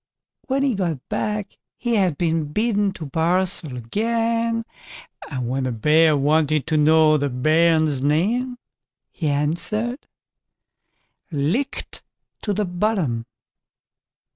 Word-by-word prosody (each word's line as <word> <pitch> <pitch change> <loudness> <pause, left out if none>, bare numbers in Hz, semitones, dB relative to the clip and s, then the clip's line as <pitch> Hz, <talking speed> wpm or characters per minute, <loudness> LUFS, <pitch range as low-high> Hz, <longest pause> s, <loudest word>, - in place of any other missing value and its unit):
When 275 0 +1
he 275 -3 +2
got 170 - -3
back 210 -1 -3 0.2
he 240 -1 -2
had 185 -9 +2
been 160 -3 0
bidden 210 0 +1
to 165 - -7
barsel 165 -1 0
again, 230 - -1 0.6
and 130 -5 -3
when 130 +1 -1
the 130 - -1
Bear 150 +6 +4
wanted 150 0 +2
to 160 - -1
know 155 0 +5
the 145 0 0
bairn's 155 +2 +2
name, 220 - 0 0.5
he 160 - -3
answered: 175 - -1 1.2
"Licked 165 - -2 0.4
to 210 - -2
the 205 +1 0
bottom." 175 - -1
165 Hz, 115 wpm, -22 LUFS, 150-215 Hz, 1.2 s, know